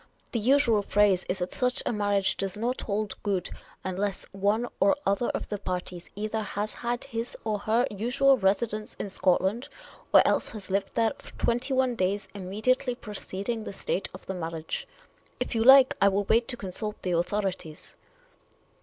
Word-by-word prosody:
The 235 - 0
usual 235 -2 +4
phrase 200 -2 +2
is 180 - 0
that 180 -1 -3
such 250 0 +1
a - - 0
marriage 205 -2 +1
does 195 0 -3
not 240 +4 -1
hold 210 0 -3
good 195 -4 -1 0.3
unless 195 +1 -2
one 205 +5 +1
or 200 - +4
other 200 +5 +1
of - - -3
the 205 - -3
parties 180 -2 -5
either 215 +2 -2
has 210 0 -3
had 240 0 -3
his 230 +1 -4
or 215 -2 -1
her 225 +4 +2
usual 250 +7 +3
residence 215 +1 0
in 200 - -5
Scotland, 190 +6 +1 0.4
or - - +7
else - - +2
has 200 -2 -8
lived 195 +1 -1
there 225 -1 +3
for - - -13
twenty 245 +3 0
one 260 -1 +2
days 200 -1 -1
immediately 220 +7 0
preceding 210 0 -5
the 200 - -7
date 190 - 0
of 185 - -12
the 190 - -4
mar 170 -3 -3
riage. 160 -1 -4 0.5
If - - -2
you 225 -1 +1
like, 265 +1 +8
I 200 - +7
will 200 +1 +2
wait 230 +4 +2
to 245 - -3
consult 210 +2 -4
the 180 - -1
authorities." 180 -2 -2
205 Hz, 180 wpm, -27 LUFS, 195-235 Hz, 0.5 s, like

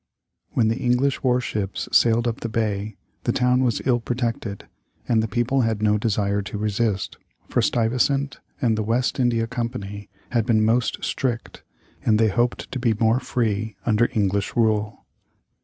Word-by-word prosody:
] - - -55
When 115 - +3
the 115 - -1
English 125 +2 +1
war 125 -1 +2
ships 105 -5 -3
sailed 115 0 +4
up 115 - -2
the 115 - -4
bay, 110 -2 -2 0.3
the - - +2
town 125 +1 +2
was 120 -4 0
ill 125 -2 +3
protected, 115 -4 -3 0.4
and 115 -2 +3
the 110 - -1
people 120 +4 +1
had 110 -2 0
no 105 0 +3
desire 100 -2 0
to 100 +1 -6
resist, 105 -1 -1 0.3
for - - +1
Stuyvesant 130 +4 +1 0.2
and 120 -6 +2
the 110 - -1
West 115 +5 0
India 120 -2 +2
Company 115 -4 -5 0.2
had 115 -2 +1
been 110 -3 +3
most 115 0 +1
strict, 120 -4 -2 0.4
and 110 -2 +3
they 110 0 +3
hoped 120 +4 -1
to 130 - -3
be 120 -3 +2
more 115 +2 +2
free 110 -4 -1
under 120 +1 +3
English 100 -1 0
rule. 110 -2 0
115 Hz, 170 wpm, -23 LUFS, 105-120 Hz, 0.4 s, sailed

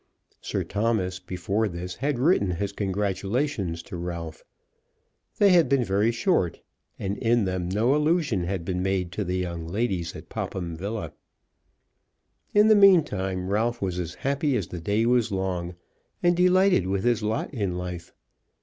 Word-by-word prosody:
Sir - - -2
Thomas 100 -4 -1
before 95 +4 -1
this 90 -1 -6
had 140 0 -1
written 130 - +3
his 95 +3 -2
congratulations 100 - -2
to - - -9
Ralph. 85 -2 -6 0.9
They 205 - +5
had 175 -3 +5
been 135 -2 +3
very 105 +2 +2
short, 115 - 0 0.4
and 100 +1 -3
in 115 -3 +2
them 90 -1 -2
no 110 +8 +2
allusion 150 - +1
had 90 -2 -3
been 90 0 -2
made 95 -2 -1
to 105 - -2
the 90 0 -2
young 85 -2 -4
ladies 95 -3 -2
at - - -10
Popham 85 -3 -4
Villa. 100 +6 -5 1.4
In 210 +1 +5
the 215 - +7
meantime 105 - +4
Ralph 115 +3 0
was 90 -2 -2
as 85 -1 -4
happy 140 0 0
as - - -4
the 90 - -6
day 105 +6 +1
was 120 -2 +2
long, 90 -2 -2 0.5
and 175 0 +4
delighted 180 - +4
with 95 0 -1
his 120 -2 +2
lot 110 +7 -2
in 100 -8 -2
life. 90 -1 -6
100 Hz, 160 wpm, -26 LUFS, 90-120 Hz, 1.4 s, the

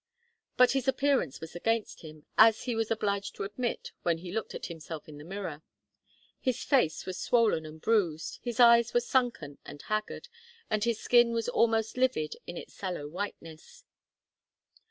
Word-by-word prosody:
But 250 0 +6
his 270 -1 -1
appearance 265 - +1
was 160 +2 -9
against 225 +5 -1
him, 155 -2 -12
as 220 0 +6
he 245 - -2
was 225 -1 -1
obliged 200 -3 -1
to - - -4
admit 230 +5 -3
when 170 -2 +1
he 175 +1 -8
looked 220 +2 -4
at - - -5
himself 160 -2 -8
in 150 -1 -11
the - - -10
mirror. 175 -4 -6 0.8
His 255 -3 -1
face 250 - +2
was 185 - -5
swollen 220 -10 +2
and 155 +1 -11
bruised, 170 -6 0
his 240 -1 -5
eyes 235 -1 +6
were - - +6
sunken 240 - -1
and 145 - -10
haggard, 215 - -3 0.4
and 215 -1 +1
his 235 -2 0
skin 240 0 +4
was 230 -1 -1
almost 225 -1 +1
livid 255 -12 +1
in 175 - -6
its - - -9
sallow 180 -7 -4
whiteness. 180 - -8
215 Hz, 170 wpm, -29 LUFS, 165-235 Hz, 0.8 s, But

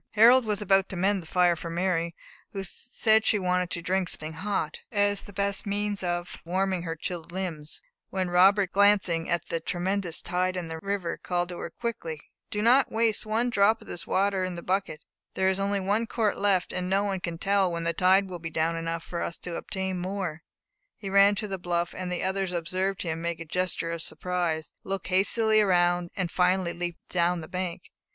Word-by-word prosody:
Harold 235 +3 +7
was 210 -1 -1
about 195 -1 +3
to - - -4
mend 195 +2 +1
the 165 - -14
fire 180 0 +3
for 165 +1 -6
Mary, 170 -1 -1 0.4
who 195 -1 -3
said 220 +2 +1
she 215 - +3
wanted 180 -2 0
to 170 - -4
drink 185 0 0
something 155 +1 -3
hot, 200 +5 -2
as 205 -2 +2
the - - -12
best 200 +1 -1
means 205 0 -1
of 175 -1 -3
warming 185 +1 0
her 165 -1 -4
chilled 170 +1 -5
limbs, 170 - -5 0.3
when 190 -1 -1
Robert, 185 +2 +4
glancing 195 -5 +3
at 170 -1 0
the 165 - -1
tremendous 180 +1 0
tide 185 +1 -1
in 170 -2 -4
the 160 0 -5
river, 195 -2 -3
called 175 -1 -1
to 175 - -6
her - - -4
quickly 170 -7 -4 0.3
"Do 210 0 -2
not 250 +4 +5
waste 220 -1 +1
one 230 +3 +1
drop 215 0 +4
of 220 - -14
this 175 - -5
water 195 0 +1
in 185 -1 -3
the 170 - -7
bucket; 185 -5 -1 0.3
there 190 0 +2
is 190 0 0
only 200 +1 +1
a 215 +3 +2
quart 220 -3 0
left, 195 -3 +1
and 180 0 -2
no 195 +1 +2
one 195 -2 -1
can 170 -2 -4
tell 195 0 +2
when 170 0 -3
the 170 0 0
tide 190 +2 +4
will 180 -2 -6
be 165 0 -5
down 160 +1 0
enough 165 0 -3
for 170 - -5
us 170 - -3
to 175 -2 -6
obtain 190 -1 -3
more." 180 -3 -3 0.6
He 195 -2 -6
ran 200 +1 +6
to 210 +1 -3
the 195 -2 -4
bluff, 175 0 -1
and 180 -1 -4
the 180 - -2
others 190 -1 -1
observed 185 +3 -2
him 165 -1 -3
make 170 -1 -2
a 165 - -6
gesture 180 0 -1
of 170 -1 -3
surprise, 175 -3 -2
look 195 -1 -4
hastily 215 +4 +3
around, 175 -3 +2
and 180 -3 -1
finally 180 -1 +2
leap 175 -1 -4
down 175 0 +1
the 155 - -8
bank. 180 -1 -5
185 Hz, 210 wpm, -27 LUFS, 170-200 Hz, 0.6 s, Harold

